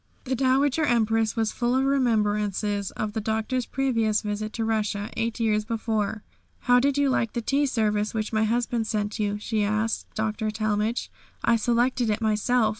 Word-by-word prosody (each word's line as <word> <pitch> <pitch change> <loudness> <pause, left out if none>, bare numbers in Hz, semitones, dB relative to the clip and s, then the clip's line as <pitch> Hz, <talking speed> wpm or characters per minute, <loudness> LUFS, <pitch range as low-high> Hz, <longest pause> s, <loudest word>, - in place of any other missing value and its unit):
The 260 - -2
Dowager 270 +4 +2
Empress 225 -4 +2
was 225 -2 0
full 240 +1 0
of 265 - +2
remembrances 210 -6 +1
of 215 -1 -4
the 220 - -2
Doctor's 220 +4 -1
previous 230 -5 +1
visit 210 +1 -3
to 225 - -2
Russia, 215 -1 -1
eight 230 +1 -2
years 215 -2 +1
before. 220 -2 -2 0.4
"How 245 -1 +4
did 280 +2 +1
you 285 0 +3
like 230 -4 0
the - - -1
tea 280 +4 +1
service 210 -4 0
which 220 0 -3
my 215 0 +2
husband 235 0 0
sent 210 0 -2
you?" 205 -1 0
she 215 0 -1
asked 215 +2 -1
Dr. 220 0 -1
Talmage; 215 +1 -1 0.3
"I 235 - +4
selected 240 +1 +1
it 210 0 0
myself. 220 +1 +2
220 Hz, 175 wpm, -25 LUFS, 215-245 Hz, 0.4 s, How